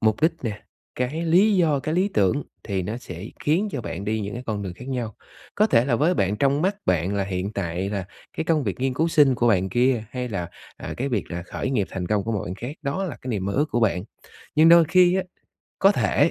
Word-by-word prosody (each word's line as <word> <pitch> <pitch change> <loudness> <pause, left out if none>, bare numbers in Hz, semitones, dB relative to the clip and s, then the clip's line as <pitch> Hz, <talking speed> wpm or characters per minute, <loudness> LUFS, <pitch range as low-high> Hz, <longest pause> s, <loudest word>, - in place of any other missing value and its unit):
mục 110 -1 +2
đích 160 - +4
nè, 105 -3 -4 0.3
cái 135 +7 -2
lý 195 +5 +5
do, 155 -6 +3
cái 155 - -2
lý 185 +3 +2
tưởng 105 +9 +2 0.2
thì 95 -3 -2
nó 105 +5 -4
sẽ 90 -5 -8 0.2
khiến 180 +8 +2
cho 140 - -2
bạn 95 +1 -5
đi 110 +1 -1
những 100 0 -4
cái 120 - -5
con 105 -2 -2
đường 95 -2 -4
khác 125 +6 -10
nhau. 120 -5 -3 0.4
Có 215 - +4
thể 115 - +4
là 125 -3 +1
với 160 +8 +2
bạn 100 - +1
trong 140 +5 +2
mắt 195 +2 +1
bạn 90 +2 +1
là 100 -1 0
hiện 95 +1 -3
tại 95 -1 -2
là 100 -3 -2 0.3
cái - - 0
công 155 -3 +1
việc 105 +3 -3
nghiên 130 -1 0
cứu 160 +5 +1
sinh 145 -5 +5
của 120 0 +2
bạn 95 -3 +2
kia, 120 +1 +2
hay 125 -1 -4
là, 95 -6 -3 0.3
à, - - -6
cái 135 - -1
việc 110 -8 -2
là 85 0 -4
khởi 130 - -4
nghiệp 110 -8 0
thành 90 -2 -4
công 105 -1 0
của 115 - -2
một 105 - -1
bạn 90 - -5
khác, 125 +8 -7
đó 155 +7 -2
là 160 -9 -5
cái 130 - -7
niềm 105 -6 -2
mơ 100 - -1
ước 145 +6 +2
của 120 - 0
bạn. 95 -4 +1 0.5
Nhưng 160 +2 +7
đôi 170 0 +8
khi 180 +2 +4
á, 190 - +1 0.6
có 195 +1 +6
thể 150 -3 +2
120 Hz, 260 wpm, -24 LUFS, 100-155 Hz, 0.6 s, đôi